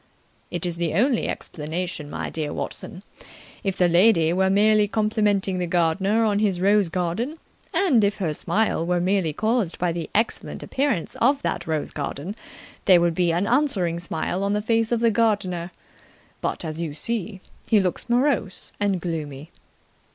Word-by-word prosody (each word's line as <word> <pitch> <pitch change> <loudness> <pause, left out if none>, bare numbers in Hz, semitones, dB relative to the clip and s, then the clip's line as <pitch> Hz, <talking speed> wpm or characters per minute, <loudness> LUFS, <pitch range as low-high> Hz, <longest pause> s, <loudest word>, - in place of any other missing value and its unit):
"It 175 0 -2
is 175 -1 -3
the 170 -2 -1
only 245 +4 +2
explanation, 160 0 -4
my - - -4
dear 155 -2 -3
Watson. 185 - -5 0.6
If 195 -3 -1
the 180 - +4
lady 170 -2 +4
were 190 +1 +2
merely 210 +1 +4
complimenting 210 -3 +1
the 175 - -1
gardener 180 +5 +2
on 205 -2 +1
his 200 -4 +1
rose 200 -1 +3
garden, 180 - -2 0.3
and 330 - +3
if 200 +1 +1
her 170 -6 -1
smile 210 +2 0
were 175 +1 0
merely 185 -2 +1
caused 215 +1 0
by 180 -1 0
the 165 -1 -4
excellent 220 +2 0
appearance 265 - -1
of 275 +4 +2
that - - -2
rose 155 -2 -2
garden, 150 +6 -5 0.5
there 185 -2 +7
would 170 -1 +2
be 175 0 +2
an 175 +4 0
answering 205 - +1
smile 170 +2 -3
on 200 +1 0
the 210 - 0
face 225 0 +1
of 235 -1 +1
the 230 -1 +4
gardener. 200 -6 0 0.7
But, - - -3
as 160 +1 -4
you 155 -4 -4
see, 205 +3 -3 0.3
he 220 - +4
looks 185 +4 -1
morose 245 -5 0
and 200 -3 +1
gloomy." 155 -3 -5
190 Hz, 165 wpm, -24 LUFS, 170-215 Hz, 0.7 s, there